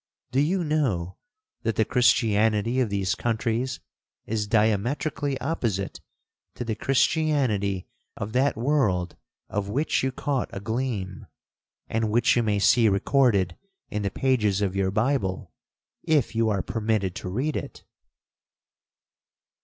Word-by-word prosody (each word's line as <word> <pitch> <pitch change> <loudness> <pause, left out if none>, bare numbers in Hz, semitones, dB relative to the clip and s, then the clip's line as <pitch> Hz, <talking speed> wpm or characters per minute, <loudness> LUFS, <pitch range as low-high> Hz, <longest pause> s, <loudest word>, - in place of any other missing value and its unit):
Do 130 - +1
you 175 +6 +1
know 120 - -1 0.4
that 115 -2 -1
the 110 - +2
Christianity 115 -1 +2
of 125 -4 +1
these 100 -2 0
countries 120 +2 -1 0.5
is 105 -1 -2
diametrically 120 +6 0
opposite 115 - -2 0.5
to 120 - -5
the 115 - -1
Christianity 125 - +1 0.3
of 105 +2 -5
that 130 -1 +2
world 110 - +1 0.3
of 100 -1 -3
which 140 +9 0
you 130 - 0
caught 135 0 -2
a 100 - -5
gleam, 110 -3 -3 0.6
and 110 -1 -1
which 120 +3 +3
you 120 - +3
may 105 -3 +1
see 110 +2 +4
recorded 100 -3 +2 0.4
in 105 - -2
the 100 - 0
pages 105 -6 +1
of 100 -2 -1
your 95 -1 +1
Bible, 105 -3 -1 0.5
if 150 -8 +1
you 115 0 +2
are 100 -3 0
permitted 110 -4 -1
to 90 - -5
read 130 +11 -1
it?' - - -6
110 Hz, 130 wpm, -25 LUFS, 100-130 Hz, 0.6 s, see